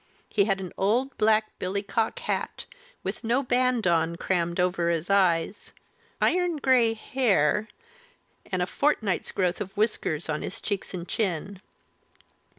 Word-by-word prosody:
He 200 Hz, -3 st, +3 dB
had 195 Hz, -2 st, +1 dB
an 185 Hz, -2 st, -6 dB
old 240 Hz, +7 st, +1 dB
black 215 Hz, 0 st, +2 dB
billycock 200 Hz, -, -1 dB
hat, 485 Hz, -, -3 dB, 0.4 s
with -, -, -4 dB
no 240 Hz, +4 st, +1 dB
band 250 Hz, -2 st, +1 dB
on, 170 Hz, -1 st, +2 dB
crammed 170 Hz, -1 st, -1 dB
over 180 Hz, -1 st, +1 dB
his 170 Hz, +2 st, -1 dB
eyes, 185 Hz, -1 st, +1 dB, 0.5 s
iron 355 Hz, -2 st, +2 dB
grey 250 Hz, -5 st, +3 dB
hair, 215 Hz, -, +1 dB, 0.8 s
and 185 Hz, -1 st, +1 dB
a -, -, +1 dB
fortnight's 215 Hz, -, 0 dB
growth 180 Hz, -2 st, 0 dB
of 195 Hz, +1 st, -6 dB
whiskers 205 Hz, -7 st, 0 dB
on 155 Hz, -1 st, -2 dB
his -, -, -5 dB
cheeks 200 Hz, -2 st, -3 dB
and 175 Hz, 0 st, -6 dB
chin. 195 Hz, -1 st, -2 dB
200 Hz, 140 wpm, -26 LUFS, 180-230 Hz, 0.8 s, He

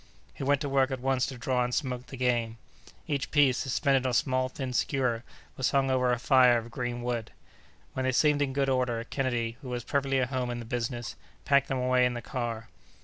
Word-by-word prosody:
He -, -, -7 dB
went 140 Hz, 0 st, +2 dB
to 145 Hz, -, -2 dB
work 135 Hz, -1 st, +2 dB
at 130 Hz, -2 st, -3 dB
once 130 Hz, 0 st, +1 dB
to 135 Hz, -, -7 dB
draw 125 Hz, 0 st, 0 dB
and 125 Hz, -, -2 dB
smoke 125 Hz, -4 st, -3 dB
the 135 Hz, -, -9 dB
game. 120 Hz, -2 st, 0 dB, 0.5 s
Each 140 Hz, -2 st, -2 dB
piece, 140 Hz, -4 st, +4 dB
suspended 135 Hz, 0 st, +1 dB
on -, -, +1 dB
a -, -, -2 dB
small, 130 Hz, +1 st, +1 dB
thin 130 Hz, -1 st, -5 dB
skewer, 125 Hz, -3 st, 0 dB, 0.3 s
was 130 Hz, -, +1 dB
hung 135 Hz, -1 st, +2 dB
over 125 Hz, -1 st, +2 dB
a 120 Hz, -, +1 dB
fire 125 Hz, -1 st, +5 dB
of 115 Hz, 0 st, -6 dB
green 120 Hz, 0 st, -4 dB
wood. 120 Hz, -2 st, -2 dB, 0.6 s
When 130 Hz, -, -2 dB
they 130 Hz, -, +2 dB
seemed 145 Hz, +2 st, +3 dB
in 140 Hz, -2 st, +1 dB
good 135 Hz, 0 st, 0 dB
order, 125 Hz, -3 st, 0 dB
Kennedy, 120 Hz, -3 st, -2 dB
who 130 Hz, -, -8 dB
was 120 Hz, -1 st, -3 dB
perfectly 135 Hz, 0 st, 0 dB
at 125 Hz, -1 st, 0 dB
home 130 Hz, -2 st, -2 dB
in 120 Hz, -, -3 dB
the 120 Hz, -, -7 dB
business, 120 Hz, 0 st, -3 dB, 0.3 s
packed 140 Hz, 0 st, +4 dB
them 135 Hz, -, -1 dB
away 125 Hz, 0 st, +3 dB
in 125 Hz, -, -3 dB
the 120 Hz, -, -4 dB
car. 115 Hz, -4 st, -4 dB
130 Hz, 225 wpm, -28 LUFS, 120-135 Hz, 0.6 s, fire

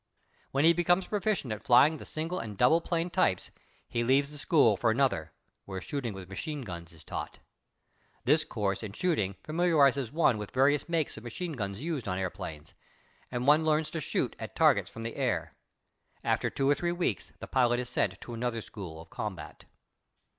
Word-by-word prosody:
When 140 Hz, +3 st, +2 dB
he 165 Hz, -, +7 dB
becomes 175 Hz, +2 st, +2 dB
proficient 205 Hz, -, -1 dB
in 105 Hz, -, -6 dB
flying 140 Hz, +8 st, +5 dB
the -, -, -10 dB
single 165 Hz, +4 st, -3 dB
and 105 Hz, -3 st, -6 dB
double 155 Hz, +9 st, +5 dB
plane 170 Hz, +1 st, -1 dB
types 95 Hz, -, +1 dB, 0.4 s
he 120 Hz, -, -1 dB
leaves 140 Hz, +4 st, +3 dB
the 150 Hz, -, -10 dB
school 140 Hz, -9 st, +4 dB
for 115 Hz, +4 st, +1 dB
another, 110 Hz, -, +1 dB, 0.3 s
where 95 Hz, -1 st, -5 dB
shooting 115 Hz, -, -4 dB
with 95 Hz, -2 st, -8 dB
machine 145 Hz, -, -5 dB
guns 85 Hz, -5 st, -7 dB
is 80 Hz, -2 st, -16 dB
taught. -, -, -6 dB, 0.9 s
This 150 Hz, +4 st, +4 dB
course 100 Hz, -4 st, -2 dB
in 105 Hz, -3 st, -6 dB
shooting 105 Hz, -, 0 dB
familiarizes 145 Hz, -7 st, +3 dB
one 150 Hz, -8 st, +3 dB
with 105 Hz, -, -5 dB
various 140 Hz, +4 st, +2 dB
makes 165 Hz, -7 st, 0 dB
of 110 Hz, -, -9 dB
machine 165 Hz, +9 st, -4 dB
guns 100 Hz, -4 st, -4 dB
used 155 Hz, -9 st, -3 dB
on 90 Hz, -1 st, -1 dB
airplanes, 80 Hz, -5 st, -5 dB, 0.6 s
and 125 Hz, 0 st, -3 dB
one 150 Hz, +3 st, +6 dB
learns 155 Hz, 0 st, +1 dB
to 165 Hz, -, -3 dB
shoot -, -, -1 dB
at -, -, -7 dB
targets -, -, +4 dB
from 115 Hz, -, -8 dB
the 115 Hz, -, -5 dB
air. -, -, -1 dB, 0.7 s
After -, -, +1 dB
two 135 Hz, -, -1 dB
or 145 Hz, -, +6 dB
three 170 Hz, +4 st, -1 dB
weeks 175 Hz, 0 st, -2 dB
the -, -, -7 dB
pilot 120 Hz, -2 st, +2 dB
is 125 Hz, -, -3 dB
sent -, -, -1 dB
to 120 Hz, -, -8 dB
another 115 Hz, 0 st, -2 dB
school 90 Hz, -8 st, -8 dB
of 80 Hz, -, -16 dB
combat. -, -, -6 dB
130 Hz, 190 wpm, -30 LUFS, 105-155 Hz, 0.9 s, he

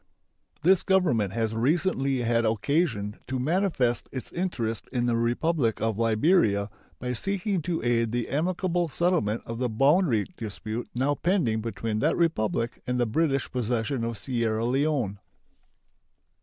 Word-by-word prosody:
This 185 Hz, +2 st, +5 dB
Government 155 Hz, -, +2 dB
has 115 Hz, -1 st, -1 dB
recently 135 Hz, +1 st, +1 dB
had 115 Hz, 0 st, +2 dB
occasion 110 Hz, -, 0 dB
to 130 Hz, -, -2 dB
manifest 140 Hz, -4 st, 0 dB
its 130 Hz, -3 st, -6 dB
interest 120 Hz, -12 st, -2 dB
in 120 Hz, -2 st, 0 dB
the 120 Hz, -1 st, +2 dB
Republic 120 Hz, +2 st, +1 dB
of 110 Hz, -1 st, -1 dB
Liberia 110 Hz, -, +3 dB, 0.3 s
by 125 Hz, 0 st, -3 dB
seeking 195 Hz, -, -1 dB
to 165 Hz, -2 st, -2 dB
aid 115 Hz, -2 st, +1 dB
the 120 Hz, -1 st, -1 dB
amicable 175 Hz, +4 st, 0 dB
settlement 160 Hz, -, 0 dB
of 115 Hz, 0 st, -5 dB
the 125 Hz, -1 st, 0 dB
boundary 135 Hz, -, +3 dB
dispute 110 Hz, +1 st, -5 dB
now 135 Hz, +4 st, +2 dB
pending 145 Hz, -, +1 dB
between 110 Hz, -1 st, -3 dB
that 155 Hz, +6 st, +1 dB
Republic 115 Hz, -8 st, 0 dB
and 125 Hz, 0 st, 0 dB
the 120 Hz, -, +2 dB
British 135 Hz, +3 st, 0 dB
possession 120 Hz, 0 st, -1 dB
of 115 Hz, -1 st, -3 dB
Sierra 115 Hz, 0 st, -1 dB
Leone. 130 Hz, -6 st, 0 dB
125 Hz, 140 wpm, -27 LUFS, 115-160 Hz, 0.3 s, This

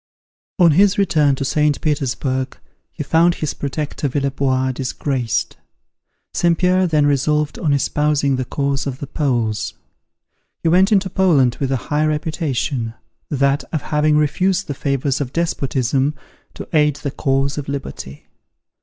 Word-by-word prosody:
On 175 Hz, -3 st, +6 dB
his 195 Hz, +5 st, +4 dB
return 155 Hz, -8 st, +3 dB
to 135 Hz, -, -3 dB
St. 150 Hz, +1 st, +1 dB
Petersburg, 130 Hz, -3 st, -2 dB, 0.3 s
he -, -, -5 dB
found 170 Hz, +4 st, +3 dB
his 155 Hz, -, -3 dB
protector 145 Hz, +1 st, -3 dB
Villebois, 135 Hz, -1 st, 0 dB
disgraced. 130 Hz, -2 st, -2 dB, 0.8 s
St. 170 Hz, -1 st, +2 dB
Pierre 185 Hz, +1 st, +3 dB
then 155 Hz, -3 st, +2 dB
resolved 145 Hz, +1 st, +1 dB
on 155 Hz, -, 0 dB
espousing 140 Hz, 0 st, +1 dB
the 130 Hz, 0 st, -2 dB
cause 140 Hz, +1 st, -1 dB
of 130 Hz, -2 st, -4 dB
the 140 Hz, -, -6 dB
Poles. 120 Hz, -7 st, -1 dB, 0.9 s
He 165 Hz, -, +3 dB
went 190 Hz, +5 st, +4 dB
into 195 Hz, -2 st, +3 dB
Poland 165 Hz, -10 st, +2 dB
with 135 Hz, -1 st, -1 dB
a 135 Hz, -, +2 dB
high 150 Hz, +1 st, +2 dB
reputation, 150 Hz, -6 st, -2 dB, 0.3 s
that 140 Hz, 0 st, +1 dB
of 155 Hz, -, -2 dB
having 150 Hz, 0 st, +2 dB
refused 180 Hz, +6 st, +1 dB
the 145 Hz, -, -4 dB
favours 140 Hz, 0 st, -1 dB
of 130 Hz, -2 st, -4 dB
despotism, 140 Hz, -4 st, 0 dB, 0.4 s
to -, -, -8 dB
aid 150 Hz, -2 st, +4 dB
the 140 Hz, -1 st, -4 dB
cause 135 Hz, +1 st, 0 dB
of 140 Hz, -, -6 dB
liberty. 135 Hz, -, -6 dB
145 Hz, 145 wpm, -19 LUFS, 135-155 Hz, 0.9 s, On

